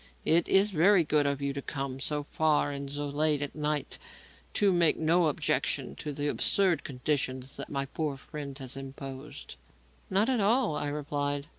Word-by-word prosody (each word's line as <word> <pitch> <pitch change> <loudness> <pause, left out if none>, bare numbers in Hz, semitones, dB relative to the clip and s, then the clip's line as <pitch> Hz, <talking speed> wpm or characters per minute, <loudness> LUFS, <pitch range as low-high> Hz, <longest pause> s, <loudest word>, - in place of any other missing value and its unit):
It 165 +1 +4
is 200 +2 +4
very 180 +2 +5
good 150 -1 +2
of 140 0 -1
you 140 0 -1
to 140 - -4
come 135 -1 -4
so 150 +1 -1
far 150 -1 +1
and 140 0 -5
so 145 +1 -3
late 150 0 +1
at 145 - -5
night 150 -2 -2
and - - -20
to 200 -2 +4
make 170 -3 +3
no 165 +2 +3
objection 145 - 0
to 150 - -5
the 145 +1 -3
absurd 185 +3 +2
conditions 130 -1 -2
that - - -5
my 140 -1 -2
poor 145 0 -3
friend 140 -1 -7
has 130 -3 -7
imposed." 135 - -8 0.5
"Not 195 +4 +3
at 260 -3 +2
all," 215 - +3
I 145 - -1
replied. 145 -1 -2
145 Hz, 180 wpm, -29 LUFS, 140-160 Hz, 0.5 s, very